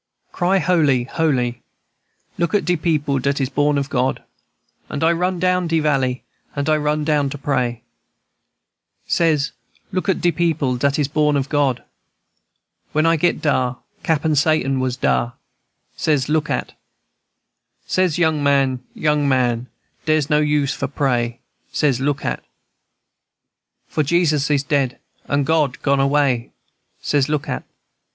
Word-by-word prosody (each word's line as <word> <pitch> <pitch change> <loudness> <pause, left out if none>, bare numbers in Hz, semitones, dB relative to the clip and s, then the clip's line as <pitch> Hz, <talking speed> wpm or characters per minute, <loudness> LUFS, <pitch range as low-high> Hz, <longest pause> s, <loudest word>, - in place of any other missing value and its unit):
"Cry 185 +2 +1
holy, 155 -8 +2
holy! 125 -4 -1 0.8
Look 170 +4 +1
at 205 - +1
de 180 - +2
people 150 -4 0
dat 140 +2 0
is 135 -2 0
born 145 +1 +1
of 140 -1 -1
God. 130 -2 -1 0.7
And 140 - -3
I 165 - +5
run 180 +2 0
down 180 0 +1
de 165 0 +1
valley, 135 -4 0 0.3
and 140 0 -2
I 155 0 +3
run 150 0 0
down 150 -2 +1
to 145 - -6
pray, 125 -4 -1 1.2
Says, 155 -4 +1 0.4
look 185 +1 -2
at 190 - +2
de 175 - +2
people 155 -6 0
dat 140 +3 +1
is 145 -3 +1
born 150 0 +2
of 135 0 -2
God. 140 -4 +1 1.1
When 155 +1 +2
I 165 0 +4
get 170 +2 0
dar, 130 -4 +1 0.2
Cappen 160 -2 +1
Satan 140 -3 +2
was 130 -1 -1
dar, 60 -2 +1 0.6
Says, 145 -5 +1
look 150 0 0
at, - - -1
&c. - - -29 1.1
Says, 185 -4 +1
young 160 -3 +2
man, 135 -2 +2 0.2
young 150 -2 +1
man, 125 -2 +1 0.4
dere's 155 -1 +2
no 150 - +4
use 150 -2 +1
for - - -3
pray, 120 -4 -1 0.3
Says, 140 -5 +1
look 145 0 -1
at, - - -1
&c. - - -38 1.4
For 155 - 0
Jesus 150 -2 +2
is 145 -2 +2
dead, 140 -3 0 0.3
and 140 -1 0
God 150 -2 +1
gone 140 -1 +2
away, 135 -3 +1 0.5
Says, 145 -1 +1
look 150 -2 -1
at, 65 - -3
&c. - - -35
145 Hz, 155 wpm, -20 LUFS, 135-155 Hz, 1.4 s, I